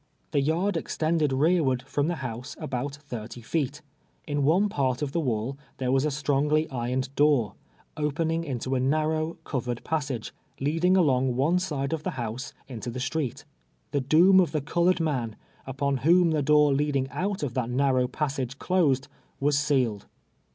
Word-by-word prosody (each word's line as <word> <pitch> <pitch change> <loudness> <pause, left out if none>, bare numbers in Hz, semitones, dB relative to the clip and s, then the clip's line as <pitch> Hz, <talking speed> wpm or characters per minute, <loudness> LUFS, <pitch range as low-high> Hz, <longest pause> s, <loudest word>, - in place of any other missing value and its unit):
The 145 - +2
yard 170 +6 +1
extended 155 -2 0
rearward 135 -3 +2
from 145 +2 -1
the 175 - 0
house 120 +1 -6
ahout 135 +2 -3
thirty 120 -5 -8
feet. 145 +3 -2 0.4
In 145 -1 -1
one 175 +9 +4
part 135 -7 -1
of 140 - -2
the 170 - 0
Avail 125 0 -2 0.2
there 130 -1 -1
Avas 135 +2 +2
a - - +3
stronijlv 150 +1 +1
irc^ned 130 +1 -2
door, 145 -7 +3 0.4
0]>eninu^ 160 +2 0
into 130 -3 -3
a 130 - +2
narrow, 155 +4 0
covered 125 -3 -3
]iassai^e, 140 -8 -2 0.3
leadin;;; 165 +6 +2
ahmij; 130 -7 +3
one 150 +8 +2
side 145 -6 -2
of 160 - -2
the 160 -3 -4
house 120 +2 -4 0.2
iiito 120 -2 -6
the 130 - -5
street. 135 0 -3 0.5
The 140 - +1
doom 170 +8 +6
of 175 -4 +2
the 155 - 0
erdored 175 +5 +2
man, 130 -9 -1 0.3
upon 135 0 -1
wliom 170 +4 +4
the 155 -2 +1
door 150 +1 +4
leadini;: 140 -1 +1
out 195 -2 -2
of 130 -5 -2
that 125 -2 -1
narnnv^ 130 0 +2
passaii 135 -4 -2
e - - -9
closed, 145 -8 +1 0.3
was 140 0 +2
sealed. 130 -9 0
140 Hz, 170 wpm, -27 LUFS, 130-155 Hz, 0.5 s, doom